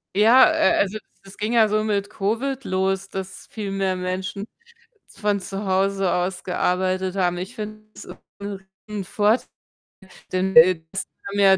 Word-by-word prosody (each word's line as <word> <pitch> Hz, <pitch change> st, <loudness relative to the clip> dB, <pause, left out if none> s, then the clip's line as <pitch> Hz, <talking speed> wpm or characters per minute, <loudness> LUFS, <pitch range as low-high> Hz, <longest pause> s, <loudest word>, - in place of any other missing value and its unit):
Ja, 230 Hz, +8 st, +7 dB
äh, 320 Hz, 0 st, +3 dB
also, 205 Hz, +2 st, 0 dB, 0.2 s
es 195 Hz, 0 st, -14 dB
ging 215 Hz, +3 st, -2 dB
ja 225 Hz, -2 st, +5 dB
so 215 Hz, +1 st, +1 dB
mit 205 Hz, -1 st, -1 dB
Covid 235 Hz, +7 st, -2 dB
los, 190 Hz, +1 st, -1 dB
dass 190 Hz, 0 st, -7 dB
viel 205 Hz, -3 st, -5 dB
mehr 195 Hz, -1 st, 0 dB
Menschen 185 Hz, +2 st, -4 dB, 0.6 s
z 195 Hz, -, -18 dB
von 205 Hz, -1 st, +1 dB
zu 195 Hz, +1 st, -5 dB
Hause 195 Hz, 0 st, +1 dB
aus 180 Hz, +1 st, -1 dB
gearbeitet 185 Hz, +1 st, 0 dB
haben. 175 Hz, -2 st, +1 dB
Ich 190 Hz, +7 st, -6 dB
finde 215 Hz, -1 st, -7 dB
es -, -, -10 dB
ist -, -, -10 dB, 0.2 s
'nen 200 Hz, -1 st, -6 dB, 0.2 s
Riesenvorteil, 210 Hz, +3 st, 0 dB, 0.9 s
denn, 185 Hz, +1 st, 0 dB
äh, 165 Hz, +1 st, +7 dB
das 195 Hz, 0 st, -3 dB, 0.2 s
haben 200 Hz, 0 st, -3 dB
ja 195 Hz, -1 st, +6 dB
195 Hz, 165 wpm, -23 LUFS, 185-210 Hz, 0.9 s, Ja